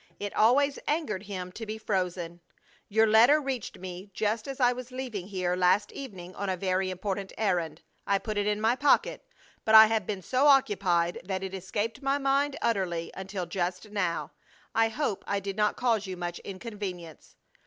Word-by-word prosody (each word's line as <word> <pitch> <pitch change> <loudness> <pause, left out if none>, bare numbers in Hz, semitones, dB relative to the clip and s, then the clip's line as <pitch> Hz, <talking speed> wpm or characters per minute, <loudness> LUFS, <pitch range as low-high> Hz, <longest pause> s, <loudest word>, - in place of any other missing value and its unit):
It 205 0 -5
always 275 +6 +4
angered 295 - -1
him 185 -3 -6
to 225 - -8
be 215 0 -5
frozen! 180 -5 -2 0.5
"Your 220 +2 +4
letter 230 +7 +6
reached 270 -6 -4
me 185 +2 -8
just 215 +2 -1
as 275 0 -6
I 245 -1 +4
was 250 0 -8
leaving 245 -8 -5
here 185 -3 -1
last 185 +3 +3
evening 185 -9 -8
on 200 0 -3
a 185 - -1
very 185 0 0
important 190 +1 -4
errand. 180 -6 -1 0.2
I 200 - +3
put 210 +1 -3
it 205 - 0
in 210 0 +1
my 225 +3 +2
pocket, 290 - +2 0.4
but 220 - +4
I 220 0 +12
have 220 -3 0
been 195 -3 -3
so 260 +7 +2
occupied 190 -10 +3
that 190 +1 -3
it 190 0 -5
escaped 205 +6 -3
my 275 +1 +1
mind 275 0 +1
utterly 180 -7 -1
until 190 -1 -5
just 180 +3 -3
now. 185 -5 -1 0.4
I 225 0 +3
hope 225 -4 -2
I 200 - 0
did 195 0 -5
not 210 0 +1
cause 225 -5 +1
you 185 -1 -5
much 175 -1 -4
inconvenience." 190 -5 -7
205 Hz, 185 wpm, -28 LUFS, 185-230 Hz, 0.5 s, I